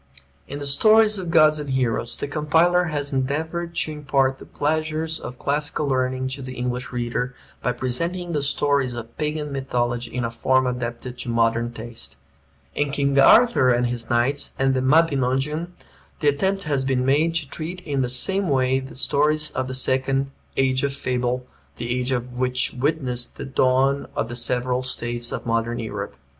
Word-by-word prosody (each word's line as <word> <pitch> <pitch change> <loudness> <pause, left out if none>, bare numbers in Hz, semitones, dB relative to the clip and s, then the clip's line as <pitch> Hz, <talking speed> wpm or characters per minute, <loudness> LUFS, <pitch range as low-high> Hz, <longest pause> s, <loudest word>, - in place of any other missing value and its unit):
In 140 - -6
the 145 - -5
"Stories 215 +8 +4
of 180 -2 -5
Gods 155 -2 +5
and 145 -1 -5
Heroes" 125 -3 -1
the - - -3
compiler 160 +4 +3
has 145 -3 -3
endeavored 160 +6 -2
to 155 - -1
impart 135 -3 0
the - - -12
pleasures 155 +1 -1
of 125 - -8
classical 145 +2 -1
learning 130 -1 0
to 135 +1 -6
the 130 0 -7
English 125 +1 -3
reader, 125 +1 -2 0.3
by 125 - 0
presenting 170 +9 -2
the 150 -3 0
stories 140 -2 +1
of 115 0 -8
Pagan 150 -1 -2
mythology 120 -3 -2
in 125 -1 -2
a 115 - -3
form 130 +2 +2
adapted 125 0 -4
to 125 - -3
modern 115 0 +1
taste. 115 - -8 0.6
In 145 0 0
"King 140 0 +1
Arthur 225 - +6
and 120 0 +3
His 120 -1 -3
Knights" 120 +4 +1
and 135 0 +2
"The 130 - +1
Mabinogeon" 145 +1 +2 0.5
the 150 - +3
attempt 190 +7 0
has 140 -3 0
been 130 -1 0
made 155 +5 +2
to 160 -4 -1
treat 165 +6 -5
in 145 -5 -1
the 125 - 0
same 190 +9 +1
way 130 -1 +2
the 135 0 -9
stories 150 +3 +1
of 130 0 -2
the 130 - -4
second 135 +1 0 0.3
"age 130 -1 +2
of 140 -1 0
fable," 125 -2 -1 0.3
the 120 +1 -2
age 125 +1 -1
which 125 0 0
witnessed 130 -3 -1
the - - -5
dawn 135 +1 +2
of 115 - -1
the 120 - -5
several 125 +1 0
states 120 -2 -3
of - - -5
Modern 115 0 0
Europe. 100 -8 -5
130 Hz, 175 wpm, -23 LUFS, 125-150 Hz, 0.6 s, Arthur